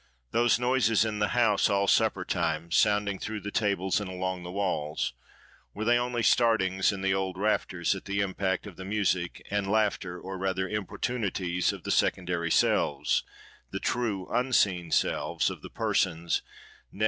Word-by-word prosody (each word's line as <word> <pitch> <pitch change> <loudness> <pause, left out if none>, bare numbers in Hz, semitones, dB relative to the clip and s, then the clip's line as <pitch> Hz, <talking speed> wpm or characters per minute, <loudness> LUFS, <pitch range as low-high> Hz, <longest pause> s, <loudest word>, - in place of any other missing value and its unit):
Those 120 0 +3
noises 120 -3 +2
in 105 -1 -3
the 105 - +2
house 110 -4 +3
all 100 -1 +2
supper - - +2
time, 85 +2 -1
sounding 105 +1 +2
through 110 -1 -4
the 100 - -5
tables 100 -3 +1
and 100 - -5
along 95 0 -3
the 90 0 -7
walls:—were 90 - -4
they 120 +1 +4
only 120 -1 -1
startings 100 -7 +3
in 100 -1 -5
the 95 0 +2
old 95 -1 -2
rafters, 95 -4 0
at 95 - -8
the 100 0 -2
impact 95 -1 -1
of 100 -5 -10
the 95 - -7
music 95 -3 -1
and 100 -1 0
laughter; 100 -4 0
or 95 0 -7
rather 95 0 -1
importunities 100 -3 -1
of - - -9
the - - -3
secondary 90 -2 +1
selves, 70 -3 +2 0.5
the - - -4
true 110 -6 -1
unseen 100 -9 +2
selves, - - +1
of - - -9
the - - -9
persons, 85 -2 0 0.5
nay! - - -14
95 Hz, 160 wpm, -28 LUFS, 90-105 Hz, 0.5 s, they